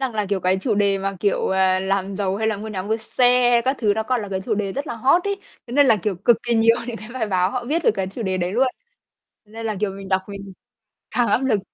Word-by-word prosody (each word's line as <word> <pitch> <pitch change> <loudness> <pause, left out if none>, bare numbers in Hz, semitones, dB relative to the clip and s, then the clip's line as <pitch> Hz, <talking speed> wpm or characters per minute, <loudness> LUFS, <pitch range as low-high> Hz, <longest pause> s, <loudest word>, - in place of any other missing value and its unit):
Rằng 260 -4 -2
là, 210 -1 -1
kiểu, 195 -1 -1
cái 185 +1 +1
chủ 225 -1 0
đề 200 -1 +2
mà, 195 0 -3
kiểu, 200 -2 +1
ờ, 190 0 +2
làm 195 0 -1
giàu, 195 -1 -1
hay 220 +1 -1
là 220 -1 0
mua 215 +2 -7
nhà, 195 -3 -4
mua 215 +3 -1
xe 245 +1 +3
các 265 +2 +1
thứ, 210 -4 +2
nó 220 - -1
còn 245 0 -1
là 205 - -6
cái 190 -1 -3
chủ 215 +3 -1
đề 200 -2 -2
rất 280 +6 -4
là 240 - -4
hot 270 +10 +3
ấy. 400 0 -1 0.3
Thế 240 - -9
nên 285 +2 +5
là, 230 -4 +5
kiểu, 200 +1 -2
cực 220 +6 +3
kỳ 240 -1 0
nhiều 230 +1 +4
những 240 -2 -4
cái 215 -1 -8
bài 250 -4 -2
báo 185 -2 +1
họ 245 +2 -3
viết 315 +7 -1
được - - +6
cái 190 -1 -2
chủ 195 +5 -6
đề 190 -2 -1
đấy 180 +1 -2
luôn. 255 +4 +3 0.8
Nên 225 +2 -7
là, 215 -2 -2
kiểu, 210 -2 0
mình 195 0 -9
đọc 190 0 +1
mình 200 -1 -8 0.6
càng 240 -3 +1
áp 245 +6 +2
lực. 220 -6 +2
210 Hz, 290 wpm, -22 LUFS, 195-240 Hz, 0.8 s, được